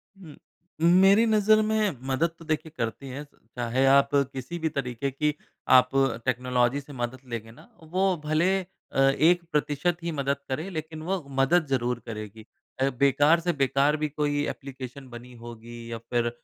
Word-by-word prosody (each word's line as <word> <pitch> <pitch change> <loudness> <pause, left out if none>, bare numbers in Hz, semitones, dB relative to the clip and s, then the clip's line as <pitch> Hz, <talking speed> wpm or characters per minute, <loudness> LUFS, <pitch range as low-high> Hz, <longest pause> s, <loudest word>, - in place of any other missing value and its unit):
उम, 175 -6 -13 0.5
मेरी 190 +6 +6
नज़र 215 -1 +4
में 215 -6 0
मदद 135 +6 +1
तो 165 - -12
देखिए, 155 0 -2
करती 115 +4 -3
है। 135 +3 -6 0.3
चाहे 125 +2 0
आप 140 0 +4
किसी 140 +4 -2
भी 160 -1 0
तरीके 135 -1 -3
की 150 +3 0 0.4
आप 125 0 +4 0.4
टेक्नोलॉज़ी 125 +1 +1
से 145 +1 -13
मदद 120 0 -4
लेंगे 115 -1 -5
ना, 120 - -17
वो 185 +4 +1
भले 155 +4 +2 0.4
अ, - - -2
1% 155 +2 +2
ही 170 - -2
मदद 140 0 0
करे, 155 +8 -3
लेकिन 155 -2 -6
वो 190 +3 -1 0.2
मदद 160 +5 +3
ज़रूर 125 -2 0
करेगी। 110 -1 -8 0.3
अ, 135 +1 +2
बेकार 145 +4 +4
से 175 - +3
बेकार 140 +1 +2
भी - - +2
कोई 145 0 -1
एप्लीकेशन 135 0 -8
बनी 120 +1 -11
होगी, 115 0 -10
या 115 - -3
फिर 120 +1 -1
140 Hz, 160 wpm, -26 LUFS, 125-165 Hz, 0.5 s, मेरी